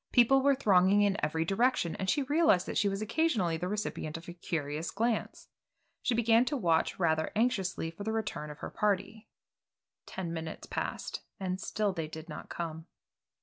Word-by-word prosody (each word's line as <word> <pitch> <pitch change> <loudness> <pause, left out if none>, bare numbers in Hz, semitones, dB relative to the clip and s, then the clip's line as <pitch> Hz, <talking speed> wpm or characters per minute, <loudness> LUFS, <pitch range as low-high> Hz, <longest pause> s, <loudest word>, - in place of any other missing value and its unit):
People 265 +2 +5
were 280 +1 +4
thronging 200 -5 +4
in 200 0 +1
every 160 +1 0
direction, 195 -2 +1
and 190 -1 -2
she 290 - +2
realized 290 - +3
that - - -5
she 200 - +3
was 195 +2 -2
occasionally 215 - +1
the 180 +2 -3
recipient 185 -6 -3
of 165 - -12
a 175 - -6
curious 160 -2 -3
glance. 225 +1 -2 0.5
She 245 - +1
began 230 0 +4
to 290 - -1
watch 165 -8 +1
rather 160 -3 +1
anxiously 195 -7 0
for 185 +5 -8
the 220 - -1
return 215 -9 -3
of 150 - -8
her - - -5
party. 210 +1 -1 0.8
Ten 175 -3 -4
minutes 160 -1 -5
passed, - - -4 0.2
and 185 -1 -3
still 210 -2 -1
they 165 -3 -3
did 160 +1 -9
not 150 - -8
come. 165 -1 -5
195 Hz, 180 wpm, -31 LUFS, 165-225 Hz, 0.8 s, People